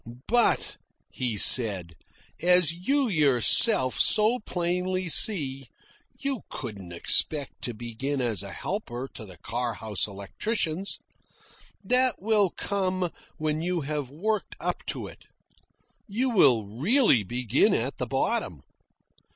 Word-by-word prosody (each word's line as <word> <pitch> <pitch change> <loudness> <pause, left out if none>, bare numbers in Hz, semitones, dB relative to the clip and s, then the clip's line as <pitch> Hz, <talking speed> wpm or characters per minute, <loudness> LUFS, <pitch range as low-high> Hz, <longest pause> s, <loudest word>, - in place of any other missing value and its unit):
"But," 240 0 +1 0.3
he 120 -4 -2
said, 100 -8 +3 0.5
"as 180 -2 +4
you 265 +11 +1
yourself 140 - +4
so 220 +3 +4
plainly 180 -1 -2
see, 140 - +1 0.5
you 275 -4 -2
couldn't 100 -8 -7
expect 140 - +2
to 120 - -4
begin 120 +5 -4
as 120 -6 -1
a 100 -1 -7
helper 135 - -5
to 110 - -8
the 90 -2 -13
car 120 +5 -3
house 105 -4 -1
electricians. 160 - -3 0.9
That 255 0 +2
will 210 -1 +2
come 185 -2 -2 0.3
when 155 -1 -2
you 175 0 -1
have 145 -2 -4
worked 205 +9 -3
up - - -3
to - - -2
it. - - -13 0.8
You 245 +5 -1
will 130 - +4
really 145 - +3
begin 120 +3 +1
at - - -3
the - - -2
bottom. - - -1
155 Hz, 120 wpm, -26 LUFS, 120-200 Hz, 0.9 s, as